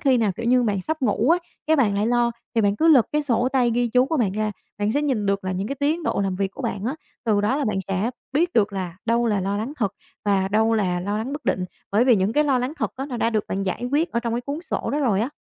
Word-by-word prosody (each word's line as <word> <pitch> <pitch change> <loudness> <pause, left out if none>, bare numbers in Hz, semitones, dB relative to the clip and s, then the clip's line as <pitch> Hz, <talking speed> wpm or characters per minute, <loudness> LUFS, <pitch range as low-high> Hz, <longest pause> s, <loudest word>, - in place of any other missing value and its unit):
khi 265 -3 +3
nào, 220 -4 +1
kiểu 230 - -4
như, 250 +1 +4
bạn 200 -4 0
sắp 310 +3 -3
ngủ 235 +4 +2
á, 345 - +5 0.3
cái 315 - +4
bạn 225 -8 +3
lại 205 +2 +1
lo 240 0 +2 0.2
thì 225 - +3
bạn 205 -1 +2
cứ 325 - +3
lật 270 -8 +6
cái 300 0 +1
sổ 250 -2 +1
tay 250 -3 +3
ghi 240 +1 +1
chú 250 +2 +4
của 320 - -1
bạn 215 -7 +1
ra, 215 +1 -1 0.3
bạn 205 +1 0
sẽ 290 - +1
nhìn 255 -8 0
được 200 0 0
là 185 - -1
những 190 +2 -2
cái 275 - -2
tiến 310 +4 +1
độ 295 - 0
làm 190 -1 -1
việc 195 0 -1
của - - -9
bạn 200 0 -3
á, 255 +5 -1 0.3
từ 210 -3 +2
đó 215 +7 +1
là 295 - 0
bạn 210 -4 0
sẽ 195 +5 0 0.2
biết 340 +5 +1
được 210 -3 +2
là 185 -3 -4
đâu 235 +1 +2
là 210 -3 +1
lo 195 +2 -1
lắng 225 +7 -3
thật 205 -7 -1 0.3
và 195 -2 +2
đâu 220 +2 +2
là 180 -4 0
lo 205 +3 -2
lắng 245 +5 -4
bất 290 0 -6
định. 185 - 0 0.3
Bởi 225 +4 +4
vì 245 -4 +5
những 190 +3 +1
cái 300 +4 +3
lo 275 -3 +2
lắng 250 +4 -2
thật - - -1
á 270 +2 -4
nó 250 -4 -5
đã 230 - +1
được 215 -2 0
bạn 195 +1 -2
giải 195 +5 -2
quyết 320 +3 +2
ở 235 - +1
trong 235 -1 -2
cái 240 - -1
cuốn 280 +4 -4
sổ - - -1
đó 295 - 0
rồi 220 -8 +2
á. 230 - 0
230 Hz, 310 wpm, -23 LUFS, 200-265 Hz, 0.3 s, lật